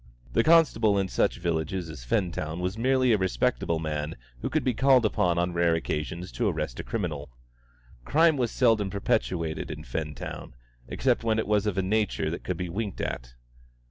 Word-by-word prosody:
The 115 Hz, -, +3 dB
constable 120 Hz, -11 st, +4 dB
in 95 Hz, -1 st, 0 dB
such -, -, +1 dB
villages 85 Hz, +2 st, -2 dB
as 75 Hz, -6 st, -9 dB
Fentown 85 Hz, -, -1 dB
was 90 Hz, +2 st, -2 dB
merely 130 Hz, +2 st, +2 dB
a 110 Hz, -, +3 dB
respectable 95 Hz, -2 st, 0 dB
man 75 Hz, 0 st, -3 dB, 0.3 s
who -, -, -2 dB
could -, -, 0 dB
be 130 Hz, -, +1 dB
called 130 Hz, -1 st, +4 dB
upon 90 Hz, -5 st, +1 dB
on 85 Hz, 0 st, 0 dB
rare 85 Hz, -1 st, +3 dB
occasions 85 Hz, +3 st, -3 dB
to 120 Hz, -, -1 dB
arrest 75 Hz, -9 st, -2 dB
a -, -, -3 dB
criminal. 80 Hz, -, -3 dB, 0.7 s
Crime 160 Hz, -, +4 dB
was 125 Hz, -4 st, 0 dB
seldom 110 Hz, -5 st, +2 dB
perpetrated 80 Hz, -4 st, -1 dB
in 75 Hz, -1 st, -6 dB
Fentown, 75 Hz, -5 st, -5 dB, 0.3 s
except 120 Hz, -, 0 dB
when 110 Hz, -1 st, +1 dB
it 110 Hz, -, 0 dB
was 105 Hz, 0 st, +1 dB
of 100 Hz, -2 st, -1 dB
a 95 Hz, -, +2 dB
nature 105 Hz, -5 st, 0 dB
that 85 Hz, -, -5 dB
could 90 Hz, -, -3 dB
be 90 Hz, 0 st, -3 dB
winked 100 Hz, +3 st, -4 dB
at. -, -, -4 dB
95 Hz, 180 wpm, -27 LUFS, 80-115 Hz, 0.7 s, constable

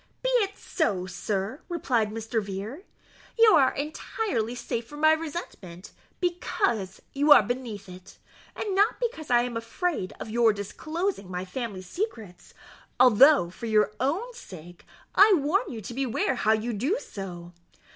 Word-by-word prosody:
"Be -, -, +1 dB
it 400 Hz, -3 st, -1 dB
so, 200 Hz, -, -1 dB
sir," 195 Hz, -, -3 dB
replied 250 Hz, -10 st, 0 dB
Mr. 225 Hz, +1 st, -2 dB
Vere; 205 Hz, -, -6 dB, 0.5 s
"you 455 Hz, -1 st, +7 dB
are 265 Hz, -2 st, +5 dB
entirely 285 Hz, -, -3 dB
safe 230 Hz, -1 st, -4 dB
from 295 Hz, +3 st, -10 dB
my 315 Hz, 0 st, +6 dB
resentment, 290 Hz, -, -6 dB, 0.3 s
because 345 Hz, -, -1 dB
you 290 Hz, +2 st, +2 dB
are 290 Hz, -, +9 dB
beneath 230 Hz, -3 st, -5 dB
it, 185 Hz, 0 st, -13 dB, 0.4 s
and 410 Hz, -, -3 dB
not 405 Hz, +4 st, +2 dB
because 465 Hz, -11 st, -3 dB
I 240 Hz, -1 st, +4 dB
am 245 Hz, -1 st, -4 dB
afraid 230 Hz, -, -2 dB
of -, -, -6 dB
your 230 Hz, -1 st, +4 dB
disclosing 310 Hz, -, -4 dB
my 180 Hz, 0 st, -4 dB
family 200 Hz, -2 st, -5 dB
secrets, 220 Hz, -, -6 dB, 0.4 s
although, 255 Hz, -, +6 dB
for 230 Hz, +5 st, -7 dB
your 215 Hz, -1 st, +3 dB
own 360 Hz, -, -1 dB
sake, 175 Hz, -, -12 dB, 0.3 s
I 410 Hz, +1 st, +7 dB
warn 330 Hz, -, 0 dB
you 225 Hz, -3 st, -6 dB
to 225 Hz, -, -7 dB
beware 265 Hz, 0 st, 0 dB
how 220 Hz, -3 st, +2 dB
you 225 Hz, +2 st, -1 dB
do 265 Hz, -, 0 dB
so. 175 Hz, -, -8 dB
240 Hz, 150 wpm, -27 LUFS, 205-320 Hz, 0.5 s, are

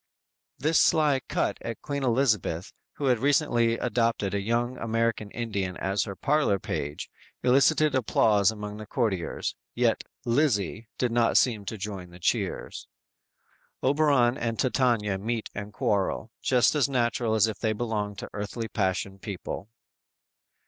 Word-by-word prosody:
"_ -, -, -17 dB
This 155 Hz, +2 st, +4 dB
sly 150 Hz, -5 st, +4 dB
cut -, -, 0 dB
at 115 Hz, -1 st, -5 dB
Queen 140 Hz, -1 st, -3 dB
Elizabeth, 115 Hz, -9 st, +1 dB, 0.2 s
who 145 Hz, -, -4 dB
had 125 Hz, -4 st, +3 dB
recently 120 Hz, -4 st, +2 dB
adopted 115 Hz, -5 st, 0 dB
a 100 Hz, -, 0 dB
young 120 Hz, +4 st, 0 dB
American 115 Hz, -2 st, -1 dB
Indian 100 Hz, -6 st, -3 dB
as 95 Hz, +1 st, 0 dB
her 100 Hz, -3 st, -6 dB
parlor 145 Hz, -7 st, +2 dB
page, 75 Hz, -5 st, -4 dB, 0.4 s
elicited 140 Hz, +3 st, +4 dB
applause 105 Hz, -5 st, +3 dB
among 105 Hz, -1 st, -5 dB
the 110 Hz, -1 st, -8 dB
courtiers, 105 Hz, -9 st, -1 dB, 0.2 s
yet -, -, +2 dB, 0.2 s
"Lizzie" 115 Hz, -, +1 dB
did 125 Hz, -2 st, 0 dB
not 115 Hz, 0 st, +3 dB
seem 110 Hz, -5 st, +2 dB
to 110 Hz, -, -4 dB
join 100 Hz, -2 st, -5 dB
in -, -, -17 dB
the 85 Hz, +1 st, -14 dB
cheers! -, -, -2 dB, 1.0 s
Oberon 140 Hz, -3 st, +3 dB
and 115 Hz, -1 st, -2 dB
Titania 120 Hz, -7 st, +1 dB
meet 115 Hz, +2 st, -3 dB
and 105 Hz, 0 st, -6 dB
quarrel, 105 Hz, +2 st, -1 dB
just 125 Hz, 0 st, +3 dB
as 145 Hz, -3 st, +2 dB
natural 120 Hz, -3 st, +1 dB
as 110 Hz, -, +5 dB
if 110 Hz, -2 st, -4 dB
they 110 Hz, -, +1 dB
belonged 105 Hz, -2 st, -2 dB
to -, -, -7 dB
earthly 105 Hz, +3 st, -4 dB
passion 95 Hz, -1 st, -1 dB
people. 100 Hz, +1 st, -6 dB
115 Hz, 150 wpm, -27 LUFS, 100-125 Hz, 1.0 s, as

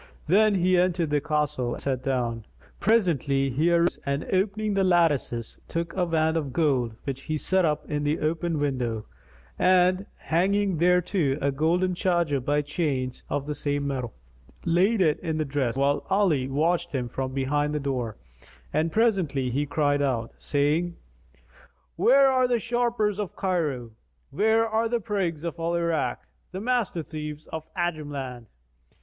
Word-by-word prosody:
Then 210 Hz, +5 st, +4 dB
he 185 Hz, 0 st, +3 dB
entered 175 Hz, -3 st, +1 dB
the 145 Hz, -1 st, +2 dB
castle 145 Hz, -5 st, -1 dB
and -, -, -7 dB
sat 130 Hz, -2 st, -1 dB
down. 120 Hz, -4 st, -2 dB, 0.3 s
Presently, 145 Hz, -, +2 dB
he 155 Hz, +7 st, +2 dB
arose 170 Hz, 0 st, +2 dB
and 140 Hz, +1 st, -1 dB
opening 205 Hz, +2 st, 0 dB
the 195 Hz, -1 st, +2 dB
lattices, 160 Hz, -, +1 dB
took 165 Hz, 0 st, -3 dB
a 180 Hz, -2 st, +1 dB
wand 160 Hz, -1 st, +1 dB
of 145 Hz, -4 st, -2 dB
gold, 130 Hz, -6 st, +1 dB
which 135 Hz, -1 st, -5 dB
he 155 Hz, -1 st, -1 dB
set 185 Hz, +4 st, +2 dB
up 150 Hz, -2 st, -1 dB
in 145 Hz, -1 st, -2 dB
the 150 Hz, +2 st, 0 dB
open 160 Hz, +1 st, -1 dB
window 125 Hz, -7 st, -1 dB, 0.5 s
and, 185 Hz, +1 st, +3 dB
hanging 195 Hz, +2 st, +1 dB
thereto 175 Hz, -4 st, +2 dB
a 140 Hz, 0 st, +1 dB
golden 170 Hz, +6 st, +1 dB
charger 170 Hz, -5 st, +1 dB
by 145 Hz, +3 st, 0 dB
chains 140 Hz, -4 st, -2 dB
of 145 Hz, -1 st, -2 dB
the 150 Hz, -, -3 dB
same 145 Hz, -1 st, -2 dB
metal, 130 Hz, -5 st, -3 dB, 0.5 s
laid 185 Hz, +5 st, +3 dB
in 155 Hz, -3 st, +2 dB, 0.2 s
it -, -, -2 dB
the 155 Hz, -, 0 dB
dress, 135 Hz, -3 st, -1 dB
whilst 140 Hz, +1 st, +1 dB
Ali 180 Hz, -10 st, +2 dB
watched 160 Hz, +5 st, 0 dB
him 125 Hz, -3 st, -1 dB
from 130 Hz, +2 st, -4 dB
behind 145 Hz, +3 st, 0 dB
the -, -, 0 dB
door, 125 Hz, -6 st, -3 dB, 0.6 s
and 160 Hz, +1 st, +1 dB
presently 165 Hz, -, +1 dB
he 145 Hz, +4 st, -1 dB
cried 145 Hz, -1 st, +1 dB
out, 120 Hz, -5 st, -1 dB
saying, 155 Hz, +4 st, 0 dB, 1.0 s
"Where 265 Hz, +10 st, +5 dB
are 255 Hz, -1 st, +3 dB
the 245 Hz, -1 st, +2 dB
sharpers 230 Hz, -3 st, 0 dB
of 205 Hz, -3 st, -4 dB
Cairo? 150 Hz, -11 st, -1 dB, 0.4 s
Where 220 Hz, +7 st, +3 dB
are 225 Hz, +1 st, 0 dB
the 240 Hz, 0 st, +1 dB
prigs 185 Hz, -7 st, -2 dB
of 170 Hz, 0 st, -4 dB
Al 165 Hz, +1 st, -1 dB
Irak, 170 Hz, -2 st, 0 dB, 0.3 s
the 185 Hz, -, -5 dB
master 225 Hz, -7 st, 0 dB
thieves 150 Hz, -1 st, -7 dB
of 160 Hz, -1 st, -4 dB
the 180 Hz, -, -1 dB
Ajam 155 Hz, -4 st, -2 dB
land? 125 Hz, -4 st, -6 dB
155 Hz, 165 wpm, -26 LUFS, 140-185 Hz, 1.0 s, Where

